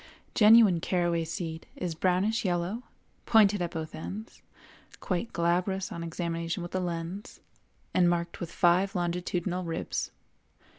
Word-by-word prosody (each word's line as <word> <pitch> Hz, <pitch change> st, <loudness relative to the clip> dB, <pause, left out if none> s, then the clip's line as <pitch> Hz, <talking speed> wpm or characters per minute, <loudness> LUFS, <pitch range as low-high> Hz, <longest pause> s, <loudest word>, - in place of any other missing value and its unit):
Genuine 215 Hz, -5 st, +7 dB
caraway 175 Hz, -1 st, 0 dB
seed 160 Hz, 0 st, -5 dB
is 180 Hz, -2 st, -3 dB
brownish 185 Hz, +7 st, +1 dB
yellow, 180 Hz, +4 st, -1 dB, 0.5 s
pointed 210 Hz, -3 st, +5 dB
at 175 Hz, -, -1 dB
both 160 Hz, -1 st, -5 dB
ends, 210 Hz, +7 st, -7 dB, 0.6 s
quite 190 Hz, +5 st, -2 dB
glabrous 180 Hz, +3 st, 0 dB
on 170 Hz, -, -5 dB
examination 170 Hz, 0 st, -3 dB
with 175 Hz, -, -8 dB
a 185 Hz, -, +1 dB
lens, 175 Hz, +5 st, -5 dB, 0.5 s
and 175 Hz, -1 st, +4 dB
marked 170 Hz, 0 st, -1 dB
with 170 Hz, -1 st, -5 dB
five 185 Hz, +3 st, +3 dB
longitudinal 180 Hz, +1 st, -1 dB
ribs. 165 Hz, -1 st, -3 dB
175 Hz, 130 wpm, -29 LUFS, 170-190 Hz, 0.6 s, Genuine